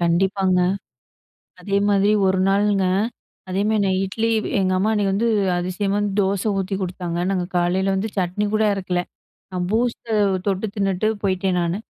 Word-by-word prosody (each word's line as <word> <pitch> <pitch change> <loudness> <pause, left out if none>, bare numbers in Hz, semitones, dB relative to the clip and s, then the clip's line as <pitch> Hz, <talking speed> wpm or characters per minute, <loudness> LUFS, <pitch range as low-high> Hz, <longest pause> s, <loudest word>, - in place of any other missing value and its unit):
கண்டிப்பாங்க. 185 +2 +2 1.0
அதே 195 +2 -1
மாரி 200 0 +3 0.2
ஒரு 190 0 +2
நாளுங்க, 200 0 +2 0.7
அதேமாரி 205 +3 +1
நான் 190 -1 +1
இட்லி 225 +4 -1 0.3
எங்க 185 -1 +1
அம்மா 210 +3 +1
அன்னைக்கு 205 -2 +1
வந்து 230 +4 +1 0.3
அதிசயமா 185 +3 -1
வந்து 205 -1 -1
தோசை 195 +2 0
ஊத்தி 195 +1 -2
குடுத்தாங்க. 180 -2 -4
நாங்க 185 -2 0
காலையில 185 +2 +1
வந்து 195 +3 -1
சட்னி 185 +2 0
கூட 215 0 +3
அறைக்கல. 185 -2 -1 0.5
நான் 180 -1 -2
பூஸ்ட்ட 235 +1 -1 0.4
தொட்டு 195 +1 0
தின்னுட்டு 195 +1 0
போயிட்டேன், 185 -1 0
நானு. 170 +3 -1
195 Hz, 145 wpm, -22 LUFS, 185-205 Hz, 1.0 s, மாரி